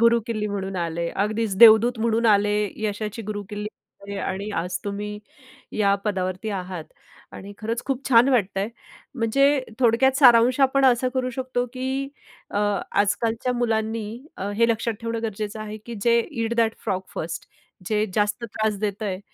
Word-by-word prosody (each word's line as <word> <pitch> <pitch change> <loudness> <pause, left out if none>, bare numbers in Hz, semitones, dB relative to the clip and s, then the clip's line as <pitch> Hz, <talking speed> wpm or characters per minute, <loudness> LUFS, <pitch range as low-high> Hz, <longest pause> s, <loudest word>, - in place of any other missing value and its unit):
गुरुकिल्ली 230 -2 +2
म्हणून 195 -1 -4
आले. 170 -1 -2
अगदीच 210 0 -1
देवदूत 230 +1 +7
म्हणून 230 +1 +1
आले. 205 -1 +4 0.3
यशाची 210 +2 -3
गुरुकिल्ली 205 0 -5 0.4
आणि 200 0 -6
आणि 195 +2 -3
आज 180 0 -3
तुम्ही, 210 +1 -4 0.5
या 200 -2 +3
पदावरती 185 0 -2
आहात 185 -4 -5 0.5
आणि 200 +1 -9
खरंच 225 +2 -3
खूप 270 0 -3
छान 245 +1 +6
वाटतंय. 200 -5 +1 0.5
म्हणजे 275 +4 +3 0.2
थोडक्यात 255 +3 +4
सारांश 250 0 +6
आपण 270 0 +4
असा 255 0 +4
करू 255 -1 0
शकतो, 255 -1 -2
की 265 +1 -2 0.4
अ, 205 - -1 0.3
आजकालच्या 225 +4 +1
मुलांनी 225 -2 -1 0.3
अ, 200 +2 -3
हे 230 +1 +4
लक्षात 225 0 0
ठेवणं 230 0 -3
गरजेचं 215 0 -4
आहे, 215 0 -6
की 235 - -6
जे 235 0 +4
ईट 230 0 -2
दॅट 225 -1 +2
फ्रॉग 185 -1 -1
फर्स्ट 165 +1 -5 0.4
जे 215 -1 +1
जास्त 210 +2 0
त्रास 215 -2 -2
देतंय. 205 -2 -2
220 Hz, 150 wpm, -24 LUFS, 205-235 Hz, 0.5 s, देवदूत